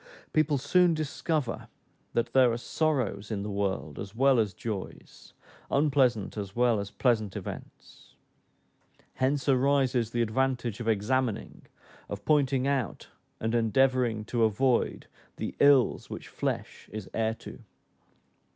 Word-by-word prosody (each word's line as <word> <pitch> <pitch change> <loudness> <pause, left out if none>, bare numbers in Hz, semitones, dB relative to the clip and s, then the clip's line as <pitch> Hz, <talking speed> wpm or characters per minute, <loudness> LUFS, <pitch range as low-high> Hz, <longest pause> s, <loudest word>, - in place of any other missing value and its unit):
People 155 -2 +2
soon 170 +5 +3
discover 155 -3 -2 0.5
that 120 0 -1
there 130 -2 +5
are 115 - -1
sorrows 120 -8 -1
in 100 -3 -3
the 105 - -4
world 100 -6 -2
as 100 +2 -7
well 135 0 +4
as 105 -3 +1
joys, 105 -5 -7 0.4
unpleasant 135 -8 +2
as 100 -1 -5
well 120 -2 +3
as 100 0 -4
pleasant 110 -3 0
events; - - -9 1.0
hence 135 +2 0
arises 130 -3 +2
the 120 0 0
advantage 125 -1 -1
of 115 - -5
examining, 115 +2 -1 0.4
of - - -6
pointing 140 -3 +2
out, 140 -6 -2 0.3
and 110 +1 -1
endeavoring 120 -1 +2
to 115 0 0
avoid 120 +3 +1 0.3
"the - - -4
ills 140 -3 +4
which - - -8
flesh - - -4
is 105 -2 -6
heir 110 0 0
to." - - -11
120 Hz, 130 wpm, -28 LUFS, 110-135 Hz, 1.0 s, there